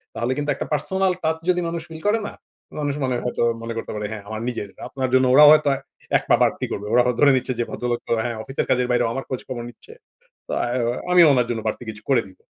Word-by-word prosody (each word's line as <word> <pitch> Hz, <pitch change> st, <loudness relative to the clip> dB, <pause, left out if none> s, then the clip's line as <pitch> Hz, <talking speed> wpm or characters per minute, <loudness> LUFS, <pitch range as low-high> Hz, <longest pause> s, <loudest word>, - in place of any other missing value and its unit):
তাহলে 120 Hz, +2 st, -1 dB
কিন্তু 145 Hz, 0 st, -2 dB
একটা -, -, -4 dB
personal 190 Hz, +6 st, 0 dB
touch 160 Hz, 0 st, 0 dB
যদি 180 Hz, 0 st, +2 dB
মানুষ 165 Hz, 0 st, -3 dB
ফিল 160 Hz, -1 st, -9 dB
করে 215 Hz, +2 st, +3 dB
না? -, -, -8 dB, 0.5 s
মানুষ 145 Hz, -1 st, -1 dB
মানে 130 Hz, -1 st, 0 dB
হয়তো 125 Hz, -, -1 dB, 0.2 s
মনে 115 Hz, 0 st, -5 dB
করতে 115 Hz, -, -5 dB
পারে, 105 Hz, 0 st, -3 dB
"হ্যাঁ, 110 Hz, -2 st, -6 dB
আমার 110 Hz, 0 st, -5 dB
নিজের। 110 Hz, -4 st, -5 dB, 0.2 s
আপনার 130 Hz, -1 st, -2 dB
জন্য 130 Hz, 0 st, +5 dB
ওরাও 150 Hz, +2 st, +9 dB
হয়তো 150 Hz, -1 st, +3 dB, 0.5 s
১ -, -, -6 dB
পা -, -, +7 dB
বাড়তি -, -, 0 dB
করবে। 105 Hz, +1 st, -4 dB
ওরা 125 Hz, +1 st, +5 dB
হ -, -, +2 dB
ধরে 145 Hz, -1 st, +6 dB
নিচ্ছে 130 Hz, 0 st, -2 dB
যে -, -, +2 dB
ভদ্রলোক 120 Hz, -1 st, -2 dB
তো -, -, -5 dB
হ্যাঁ, 120 Hz, 0 st, -3 dB
অফিসের 135 Hz, +3 st, -3 dB
কাজের 125 Hz, -1 st, +2 dB
বাইরেও 120 Hz, -1 st, +2 dB
আমার 135 Hz, -, -4 dB
খোঁজখবর 125 Hz, -2 st, -5 dB
নিচ্ছে। 435 Hz, -, -14 dB, 0.5 s
তো -, -, -7 dB
অ্যাও 120 Hz, -1 st, -1 dB, 0.2 s
আমিও 175 Hz, -2 st, +7 dB
উনার 125 Hz, -3 st, +2 dB
জন্য 115 Hz, -2 st, -2 dB
বাড়তি 110 Hz, -, -3 dB
কিছু 105 Hz, -1 st, -8 dB
করে 130 Hz, -4 st, +4 dB
দিব।" 95 Hz, -, -18 dB
130 Hz, 240 wpm, -22 LUFS, 120-150 Hz, 0.5 s, ওরাও